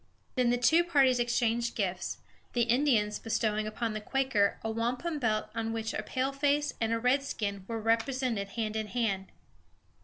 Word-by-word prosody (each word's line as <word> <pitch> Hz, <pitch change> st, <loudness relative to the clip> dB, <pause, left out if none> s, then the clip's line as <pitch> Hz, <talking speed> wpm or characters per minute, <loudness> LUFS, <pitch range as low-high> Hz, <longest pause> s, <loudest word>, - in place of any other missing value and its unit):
Then 250 Hz, -2 st, +2 dB
the 245 Hz, -, +2 dB
two 320 Hz, +8 st, +4 dB
parties 275 Hz, -7 st, +3 dB
exchanged 235 Hz, 0 st, +1 dB
gifts, 190 Hz, -3 st, -2 dB, 0.4 s
the 240 Hz, -, +3 dB
Indians 235 Hz, -4 st, +2 dB
bestowing 215 Hz, -1 st, 0 dB
upon 225 Hz, +1 st, -2 dB
the 215 Hz, -, -4 dB
Quaker 240 Hz, -4 st, +1 dB
a 225 Hz, -, -1 dB
wampum 250 Hz, +8 st, -2 dB
belt 215 Hz, -4 st, 0 dB
on 225 Hz, 0 st, -2 dB
which 225 Hz, 0 st, -3 dB
a -, -, -2 dB
paleface 280 Hz, +2 st, 0 dB
and 225 Hz, 0 st, +1 dB
a 230 Hz, -, +2 dB
redskin 230 Hz, -6 st, 0 dB
were 230 Hz, -1 st, -3 dB
represented 230 Hz, -1 st, 0 dB
hand 215 Hz, +1 st, -3 dB
in 220 Hz, -1 st, -2 dB
hand. 205 Hz, -5 st, -1 dB
230 Hz, 160 wpm, -30 LUFS, 215-255 Hz, 0.4 s, two